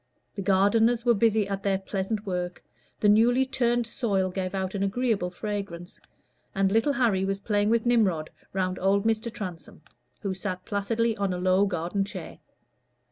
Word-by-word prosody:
The - - -5
gardeners 220 +5 +3
were 240 - +5
busy 220 -1 +2
at 195 -1 -3
their 195 -1 +1
pleasant 195 +2 -3
work; 180 -2 -3 0.4
the 210 - +2
newly 235 +5 +5
turned 240 -2 +1
soil 200 -6 -1
gave 185 0 -3
out 190 -1 -2
an 200 - -3
agreeable 200 -2 0
fragrance; 185 -3 -6 0.6
and 195 0 +2
little 225 +7 +2
Harry 230 -8 +2
was 195 0 -1
playing 205 0 +1
with 230 0 +2
Nimrod 200 -10 +2 0.2
round 185 -1 -1
old 195 +2 +2
Mr. 225 +1 0
Transome, 180 -6 -8 0.4
who 195 -3 -2
sat 185 -1 -5
placidly 225 +2 0
on 200 -2 0
a - - -3
low 185 +2 +3
garden 180 +2 -1
chair. 200 - -8
200 Hz, 165 wpm, -27 LUFS, 190-225 Hz, 0.6 s, were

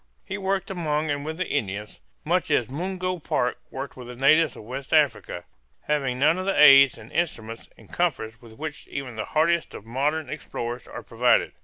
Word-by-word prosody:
He 190 - -4
worked 195 -1 -1
among 155 -4 -1
and 145 0 -2
with 160 +1 -5
the 185 - -2
Indians, 105 - -3 0.2
much - - +1
as - - +1
Mungo 185 +3 -3
Park 125 -5 -1
worked 135 +1 -6
with 125 -2 -10
the 125 - -8
natives 145 +3 +4
of - - -10
West 130 +6 -3
Africa, 105 - +1 0.4
having 135 -4 -1
none 155 +6 +3
of 185 - -4
the 195 - +1
aids, 140 -3 +8
instruments, 115 -2 -4
and - - -17
comforts 115 -11 -2
with 115 -2 -14
which 150 +5 -7
even 135 -4 -6
the 110 - -3
hardiest 165 +2 +1
of 105 - -9
modern 145 +6 -1
explorers 120 -4 -5
are - - -8
provided. 120 +1 +2
140 Hz, 185 wpm, -25 LUFS, 120-160 Hz, 0.4 s, aids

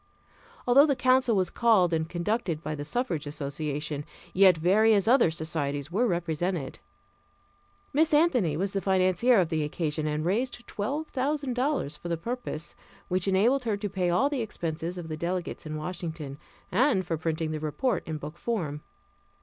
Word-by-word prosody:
Although 275 +5 +6
the 280 - +2
council 255 -2 +3
was 185 -2 +1
called 205 -7 +3
and 160 0 0
conducted 175 -2 -2
by 155 - -3
the 145 -1 -5
suffrage 170 - -2
association, 145 0 -3 0.3
yet 185 -2 +6
various 200 +5 +4
other 245 -6 +5
societies 155 -2 -3
were 230 +7 +2
represented. 170 -3 -2 1.1
Miss 315 +3 +3
Anthony 255 - +3
was 195 +3 -1
the 195 - -1
financier 190 +5 +3
of 175 -3 +1
the 160 -2 0
occasion 150 0 -2
and 150 +1 -1
raised 235 +6 -1
twelve 285 +10 -3
thousand 280 0 -1
dollars 250 - -1
for 175 - -7
the 170 - 0
purpose, 230 -5 -5 0.4
which 185 +1 0
enabled 225 +8 +3
her 215 -3 0
to 205 0 -3
pay 185 -2 0
all 180 +11 +3
the 285 -3 -2
expenses 170 -5 -4
of 175 -2 -6
the 155 - -4
delegates 175 0 -3
in 155 - -4
Washington, 160 -3 -5 0.3
and 215 -2 +3
for 165 - -1
printing 160 0 -2
the 155 - -3
report 155 - -1
in 160 -1 -3
book 150 +3 -8
form. 160 -11 -2
180 Hz, 165 wpm, -28 LUFS, 155-235 Hz, 1.1 s, Although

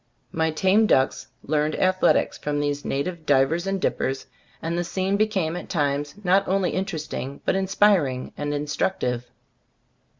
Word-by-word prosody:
My 160 0 +1
tame 190 +7 +3
ducks 130 -7 +2 0.2
learned 150 0 0
athletics 185 0 +2
from 145 0 -2
these 145 0 -1
native 160 +4 -3
divers 145 +6 +2
and 195 0 0
dippers, 135 -6 -1 0.3
and 165 +1 -3
the 175 - 0
scene 190 +3 -1
became 200 -6 0
at 180 - -7
times 145 -3 -1
not 195 +2 +3
only 190 -1 +1
in 190 - 0
teresting, 155 -6 -5
but - - +2
inspiring 190 -9 +2
and 145 0 -3
instruc 150 +6 -1
tive. 125 0 -2
160 Hz, 155 wpm, -24 LUFS, 145-190 Hz, 0.3 s, tame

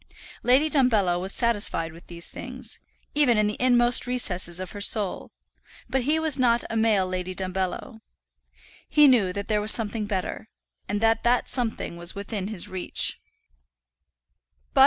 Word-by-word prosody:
Lady 260 +5 +3
Dumbello 220 - +2
was 190 +1 -3
satisfied 205 -9 0
with 170 +1 -16
these 170 0 -4
things, - - -6 0.3
even 285 -6 +3
in 215 - +3
the 210 0 -2
inmost 245 -1 +3
recesses 185 -8 +1
of 185 -1 -6
her 205 - -8
soul; 200 -1 +2 0.6
but 260 +2 -1
he 295 +6 +1
was 315 -4 0
not 240 -2 +2
a - - -3
male 220 -4 +2
Lady 185 0 -4
Dumbello. 190 +5 -4 0.9
He 300 -1 +6
knew 225 -9 +3
that 200 +1 -5
there 210 -1 0
was 210 - -2
something 215 -1 +3
better, 205 +2 -4 0.4
and 205 +1 -2
that 225 0 +2
that 240 +1 +1
something 230 -8 -1
was 170 +2 -4
within 200 -1 -5
his 205 -2 -3
reach. 185 -2 -3
215 Hz, 155 wpm, -25 LUFS, 185-245 Hz, 0.9 s, He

